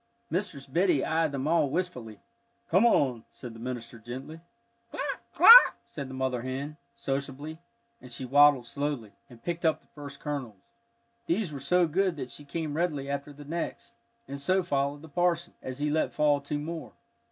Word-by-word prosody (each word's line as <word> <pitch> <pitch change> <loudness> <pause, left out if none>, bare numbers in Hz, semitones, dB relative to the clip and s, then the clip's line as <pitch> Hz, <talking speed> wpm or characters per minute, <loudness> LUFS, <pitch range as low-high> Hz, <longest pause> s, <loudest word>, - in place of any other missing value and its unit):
Mistress 165 -7 -2
Biddy 170 +1 +2
eyed 160 -1 +1
them 140 0 -3
all 160 -3 +3
wistfully. 130 - -4 0.5
"Come 190 +8 +6
on," 130 - +2
said 120 -3 -10
the 115 - -12
minister, 120 -1 -6
gently. 130 +8 -8 0.5
"Cluck - - -4
cluck," 485 +2 +9
said 140 -3 -7
the 130 - -7
mother 130 -2 -1
hen, 135 +4 -5 0.2
sociably, 140 +3 -4 0.4
and 125 - -12
she 125 +2 -5
waddled 145 -1 +5
slowly, 130 -3 -3 0.2
and 120 -2 -16
picked 170 0 -3
up 160 -2 +2
the - - -32
first 140 -2 -10
kernels. 135 -8 -5 0.7
These 175 -2 0
were 140 - -5
so 180 +6 +3
good 180 +2 +1
that 130 -4 -6
she 145 - -8
came 155 +1 -4
readily 145 -5 -1
after 140 +1 -4
the 145 0 -12
next, 170 +9 -5 0.3
and 140 - -6
so 185 +7 +2
followed 140 0 -1
the - - -10
parson, 175 +2 0
as 130 0 -6
he 150 +1 -1
let 155 +1 0
fall 145 -1 +2
two 145 +1 -3
more. 160 +1 -6
145 Hz, 175 wpm, -28 LUFS, 130-165 Hz, 0.7 s, cluck